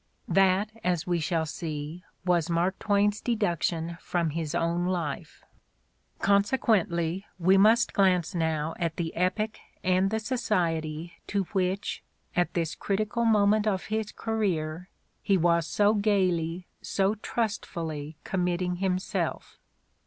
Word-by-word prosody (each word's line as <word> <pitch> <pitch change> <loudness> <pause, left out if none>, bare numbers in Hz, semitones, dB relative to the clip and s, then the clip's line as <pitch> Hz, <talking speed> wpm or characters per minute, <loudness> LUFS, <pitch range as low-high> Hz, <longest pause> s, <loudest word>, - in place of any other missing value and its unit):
' - - -43
' - - -41
That, 195 +2 +3
as 175 -2 0
we 175 -1 0
shall 160 0 0
see, 155 +1 -5 0.2
was 175 -2 +2
Mark 175 +3 +1
Twain's 205 0 +2
deduction 170 -7 -1
from 170 -3 -1
his 165 +1 -3
own 170 +1 0
life. 170 -6 -3 0.7
Consequently, 200 -4 +1
we 185 +2 +4
must 220 +4 +5
glance 185 -2 +3
now 160 -2 0
at 165 -2 -1
the 165 -2 -3
epoch 210 +5 0 0.2
and 185 +1 +3
the 220 - 0
society 170 -9 -1
to 200 -1 0
which, 190 +1 -1 0.3
at 175 0 +1
this 165 -2 0
critical 215 +4 -1
moment 215 -1 +4
of 190 -3 0
his 220 -1 -1
career, 180 -6 -2 0.3
he 195 - +3
was 170 -1 +2
so 210 0 +3
gaily, 185 -5 +1 0.2
so 195 +1 +1
trustfully 165 -9 -3
committing 180 -1 -1
him 185 0 +1
self. 185 -3 -3
180 Hz, 130 wpm, -28 LUFS, 170-205 Hz, 0.7 s, must